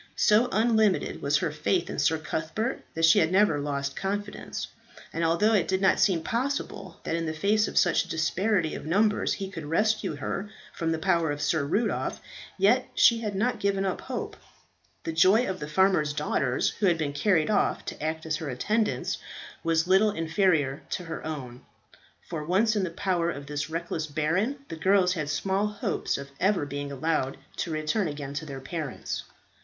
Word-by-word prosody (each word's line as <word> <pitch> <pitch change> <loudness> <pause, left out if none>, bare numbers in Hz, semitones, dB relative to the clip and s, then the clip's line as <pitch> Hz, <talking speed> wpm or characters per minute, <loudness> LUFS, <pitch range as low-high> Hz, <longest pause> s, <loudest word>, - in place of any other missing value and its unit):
So 225 +3 +4
unlimited 220 -3 +2
was 140 +1 +2
her 150 - -1
faith 165 +4 0
in - - -4
Sir 150 +3 +3
Cuthbert 165 +10 -3
that 165 0 +3
she 165 - +6
had 160 +1 +2
never 190 -6 +4
lost 140 -1 -2
confidence; 205 +1 -4 0.5
and 165 - -1
although 170 +7 +3
it 200 -5 +2
did 190 0 +1
not 190 -1 +3
seem 190 -4 +3
possible 265 +4 -3
that - - -1
in 165 -1 -2
the 160 - -3
face 210 +5 +2
of - - -5
such - - +4
disparity 175 +1 +1
of - - -6
numbers 205 +7 +2
he 195 - -4
could 165 -6 -7
rescue 215 +1 +1
her 190 +8 -4 0.2
from 165 -1 -1
the 160 - 0
power 170 -1 +1
of 145 0 -2
Sir 155 0 +1
Rudolph, 205 +11 -1 0.4
yet - - +3
she 230 -1 +5
had 210 -3 -3
not 235 +3 0
given 195 -1 0
up 190 - -2
hope. 255 -2 -5 0.7
The 165 - -3
joy 190 +9 +5
of 185 -1 -3
the 150 - -5
farmers' 155 -3 +2
daughters 130 -2 0
who 205 - +3
had 170 -2 +3
been 150 -3 -2
carried 165 +2 +2
off 205 - +1
to - - -6
act 160 +1 -2
as 155 -1 -1
her 155 -2 -5
attendants 210 - -1 0.4
was 165 0 +2
little 190 +4 +4
inferior 160 -5 +1 0.2
to 180 - -9
her 165 - -6
own; 130 -6 -6 0.7
for 160 -3 -4
once 205 +7 +2
in 205 - +1
the 185 - -1
power 175 -1 0
of 140 -4 -5
this 145 +1 -3
reckless 165 -1 -3
baron, 185 - -1
the - - -5
girls 185 +1 +3
had 155 -5 -3
small 195 +7 0
hopes 210 -1 -2
of 140 0 -8
ever 190 -5 +2
being 145 0 -5
allowed 140 -1 -1 0.2
to - - -2
return 155 +6 0
again 145 -2 -5
to 150 +2 -5
their 135 -2 -6
parents. 150 -1 -5
165 Hz, 190 wpm, -27 LUFS, 155-200 Hz, 0.7 s, she